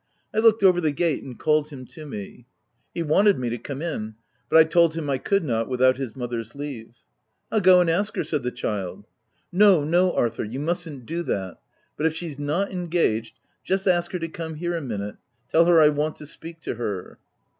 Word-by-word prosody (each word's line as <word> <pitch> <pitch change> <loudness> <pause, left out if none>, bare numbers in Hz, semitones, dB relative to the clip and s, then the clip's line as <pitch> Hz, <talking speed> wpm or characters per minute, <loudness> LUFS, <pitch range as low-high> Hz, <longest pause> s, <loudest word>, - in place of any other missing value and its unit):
I 215 - +1
looked 220 -2 +4
over 180 -2 +5
the 155 -2 +1
gate 160 0 0
and 125 -3 -9
called 150 -1 +1
him 135 -4 -9
to 155 -2 -10
me. 115 0 -8 0.4
He 170 - -3
wanted 195 +6 +4
me 125 -2 -2
to 120 - -3
come 140 +5 -6
in; 110 -10 -4 0.3
but - - +5
I 160 - +9
told 165 0 +3
him 160 -3 -3
I 135 - 0
could 200 +7 +1
not 115 -5 -1
without 130 0 +3
his 130 -5 -5
mother's 120 -2 -5
leave. 135 -6 -7 0.3
" - - -49
I'll 220 - +2
go 185 -1 +7
and 175 - +1
ask 200 +6 0
her," - - 0
said 150 -3 -2
the 125 - -2
child. 100 -5 -4 0.3
* - - -42
No, 190 -4 +5
no, 175 +4 +3
Arthur, 115 -1 0
you 115 +5 -5
mustn't 160 -4 -3
do 165 +5 -3
that, 95 -3 -3 0.2
— - - -42
but 155 - +2
if 160 - -2
she's 160 -4 -5
not 150 +8 -1
engaged, 170 - -1 0.3
just 190 +1 -1
ask 175 -1 +2
her - - 0
to 165 -1 -4
come 160 -1 -6
here 175 +2 -2
a 165 - -2
minute: 105 -6 -5 0.3
tell 165 +1 +5
her 170 -1 +6
I 150 -1 +7
want 150 +1 -1
to 150 - -11
speak 165 +3 -10
to - - -3
her." 100 -6 -5
155 Hz, 225 wpm, -24 LUFS, 125-175 Hz, 0.4 s, I